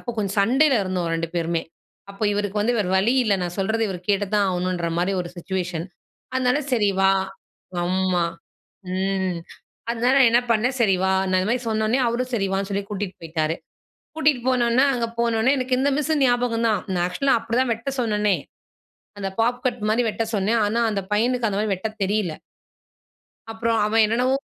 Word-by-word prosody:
அப்ப 240 - -5
கொஞ்சம் 200 -1 -2
சண்டைல 265 +6 +4
இருந்தோம், 180 -3 -2
2 165 0 -2
பேருமே. 165 -1 -1 0.5
அப்ப 195 - -10
இவருக்கு 205 0 -1
வந்து 240 +2 +1
வேற 190 -3 0
வழி 225 +7 +3
இல்ல. 205 -2 +3
நான் 175 0 -4
சொல்றத 220 +4 0
இவரு 185 -2 -4
கேட்டு 205 0 +2
தான் 205 -1 +3
ஆகணும்ன்ற 180 -1 -1
மாரி 180 +3 +1
ஒரு 175 - -5
சிட்சுவேஷன். 175 -1 -3 0.5
அதனால, 255 +1 +2
"சரி 210 -5 +3
வா" 195 0 +5 0.7
ஆம்மா. 185 -1 +1 0.7
ம். 190 -1 -1 0.5
அதனால, 240 +2 +1
நான் 255 -3 +7
என்ன 240 +1 +4
பண்னேன், 245 +4 +1
"சரி 205 -5 +4
வா" 190 - +2 0.2
நான் 185 - +3
இந்த 190 - -1
மாரி 250 +1 0
சொன்ன 220 0 0
உடனே, 245 +5 +2
அவரும் 250 +2 -2
சரி 195 -3 0
வான்னு 195 +1 -1
சொல்லி 200 0 -2
கூட்டிட்டு 200 -3 -4
போய்ட்டாரு. 160 0 -1 0.6
கூட்டிட்டு 290 -6 +2
போனொன்னே, 250 +1 +3
அங்க 235 -2 -1
போனொன்னே, 235 +2 +2
எனக்கு 255 0 0
இந்த 285 +1 +2
மிஸ்ஸு 310 +1 0
ஞாபகம் 245 -2 +1
தான். 215 - +1
நான் 175 -1 0
ஆக்சுவலா 235 +10 +1
அப்படி 230 +1 -2
தான் 255 -2 +1
வெட்ட 230 +5 -5
சொன்னனே. 210 -4 +1 0.8
அந்த 195 -1 -2
பாப் 245 +2 +1
கட் 245 -3 -1
மாரி 225 +3 +2
வெட்ட 225 +2 -2
சொன்னேன். 215 +4 +1
ஆனா, 230 +3 0
அந்த 200 -2 -1
பையனுக்கு 240 +2 +1
அந்த 200 0 -2
மாரி 215 -1 -1
வெட்டத் 215 +3 -5
தெரியல. 195 -3 0 1.2
அப்புறம் 225 0 0
அவன் 220 +1 +3
என்னென்னவோ, 250 +5 +2
215 Hz, 180 wpm, -23 LUFS, 190-240 Hz, 1.2 s, நான்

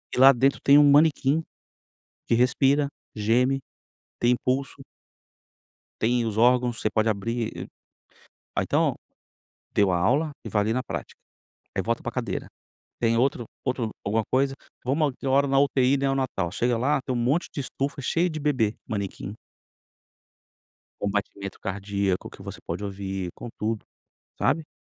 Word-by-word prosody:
E - - -6
lá 135 +2 +9
dentro 135 +2 +2
tem 140 +1 +7
um 145 -1 +7
manequim, 150 +1 +4 0.8
que - - +3
respira, 135 +4 +3 0.3
geme, 125 +5 +2 0.6
tem 120 +1 +4
impulso 130 +3 -1 1.2
tem 120 +1 +2
os 110 -2 -3
órgãos, 120 0 +3
você 110 - +1
pode 110 +1 +1
abrir. 115 +2 -2 0.9
A - - +3
então, - - +1 0.8
deu 100 -2 +4
a 90 - +2
aula 140 - +2
e - - -5
vai 105 - +1
ali 110 +2 0
na 125 +2 0
prática. - - -6 0.6
Aí - - +1
volta - - -1
para - - -4
cadeira. - - -3 0.5
Tem 115 -1 +2
outro 125 0 +1 0.2
outro 125 -4 -1
alguma 110 +2 +1
coisa, 135 +1 +2 0.3
vamos, 140 +3 +1
deu 135 - -2
hora 140 +1 +4
na 135 0 +2
UTI 140 -1 +3
neonatal, 135 -10 0
chega 120 +4 0
lá 140 +5 +2
tem 130 - -2
um - - -1
monte 135 +9 +1
de - - -4
estufa 140 +1 -3
cheia 170 +7 +1
de 155 -1 -5
bebê, 130 -8 +1
manequim. 100 -1 -4 1.7
Com 100 - -1
batimento 100 -1 -4
cardíaco 100 -1 -2
que - - -14
você - - -8
pode - - -5
ouvir, 95 -2 -4
com 120 - -8
tudo, 110 0 -2 0.5
sabe? 160 -2 +1
125 Hz, 150 wpm, -26 LUFS, 105-135 Hz, 1.7 s, lá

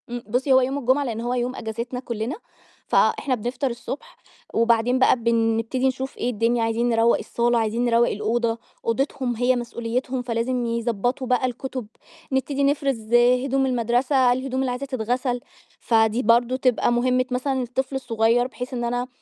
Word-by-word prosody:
إمم. 240 0 -5
بُصّي، 255 +5 +1
هو 260 - +6
يوم 265 +2 -1
الجمعة 270 +1 +2
لإن 230 -4 -3
هو 240 +1 -2
يوم 250 +1 -1
أجازتنا 235 +3 -5
كُلّنا، 235 +2 -4 0.5
فإحنا 265 -3 +2
بنفطر 250 +4 -2
الصبح، 275 - -7 0.4
وبعدين 230 +2 +2
بقى 260 - +5
بنبتدي 230 +2 +1
نشوف 265 +1 -3
إيه 245 - -1
الدنيا 230 +1 +1
عايزين 230 +2 0
نروّق 230 0 +3
الصالة، 240 0 0
عايزين 225 +2 0
نروّق 235 0 +3
الأوضة، 225 +2 -1 0.3
أوضتهم 255 +1 -1
هي 250 +2 +2
مسؤوليتهم 245 +2 -3
فلازم 245 +1 -1
يضّبطوا 235 +2 -1
بقى 250 +1 +2
الكُتب، 255 -1 -4 0.4
نبتدي 275 +1 0
نفرز 275 -6 0
هدوم 250 +3 +3
المدرسة 250 +1 +2
الهدوم 260 +1 -3
اللي 265 -1 0
عايزة 250 +3 -4
تتغسل، 245 0 -2 0.4
فدي 225 +1 +2
برضه 235 +3 +3
تبقى 255 -2 +2
مهمِة 255 +1 +2
مثلًا 260 +1 -1
الطفل 265 +3 -3
الصغير، 235 -1 +1
بحيث 255 0 -7
إن 240 -1 -2
أنا 245 +1 -1
245 Hz, 155 wpm, -23 LUFS, 230-260 Hz, 0.5 s, هو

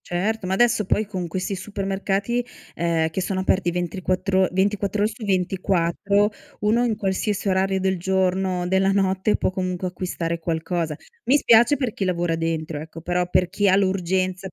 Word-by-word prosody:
Certo, 195 +3 -1
ma 185 - 0
adesso 235 -1 +3
poi 215 +3 +1
con 185 -4 -4
questi 185 +4 -3
supermercati, 200 +4 -2 0.3
ehm, 165 -1 0
che 190 - -2
sono 190 0 -1
aperti 190 -1 +1
ventriquattro 185 +2 0
24 200 +2 0
ore 215 - +1
su 225 0 -10
24, 190 +1 +1 0.3
uno 220 +4 +2
in 235 -3 +1
qualsiasi 200 0 -1
orario 190 0 +1
del 190 -1 0
giorno, 185 0 0
della 190 +1 +2
notte 195 +1 +1
può - - 0
comunque 185 -1 -2
acquistare 170 -2 -3
qualcosa. 165 -1 -2 0.3
Mi 275 - +5
spiace 240 +2 +5
per 250 -5 -2
chi - - -3
lavora 175 -2 0
dentro, 160 -2 -2
ecco, 160 +1 -9
però 180 +1 -1
per 180 -1 +2
chi 200 +1 +2
ha 185 - +5
l'urgenza, 185 -1 0
190 Hz, 165 wpm, -23 LUFS, 180-200 Hz, 0.3 s, Mi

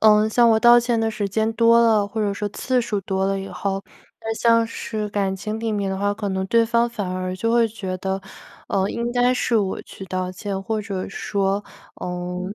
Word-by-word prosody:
嗯， 215 0 +5
像 235 +1 +5
我 220 -1 +4
道 240 +1 +8
歉 240 -1 +1
的 225 0 +1
时 205 -3 -2
间 220 +3 0
多 230 0 +5
了， 220 -3 +4
或 220 +2 -4
者 205 -1 +1
说 205 +1 -3
次 250 +4 0
数 210 -3 -2
多 190 0 -1
了 195 0 0
以 195 - -6
后， 195 0 -3 0.4
那 225 0 -3
像 230 0 +4
是 215 -2 -4
感 195 -2 -1
情 215 +3 -4
里 225 -1 -2
面 200 -2 -1
的 190 - -3
话， 205 0 0
可 205 -2 -3
能 190 0 -2
对 230 +2 +4
方 235 +1 +2
反 210 -5 -4
而 185 0 -3
就 230 +4 -1
会 235 -1 +4
觉 195 -4 -5
得， 190 +1 -2 0.5
呃， 195 0 +1
应 235 0 -2
该 245 +1 +3
是 235 -2 +1
我 195 -3 -1
去 195 - -10
道 185 0 -3
歉， 195 +1 -4
或 215 +2 -2
者 195 -3 -4
说， 200 0 -1 0.4
嗯 180 +2 -4
210 Hz, 240 characters per minute, -22 LUFS, 195-230 Hz, 0.5 s, 道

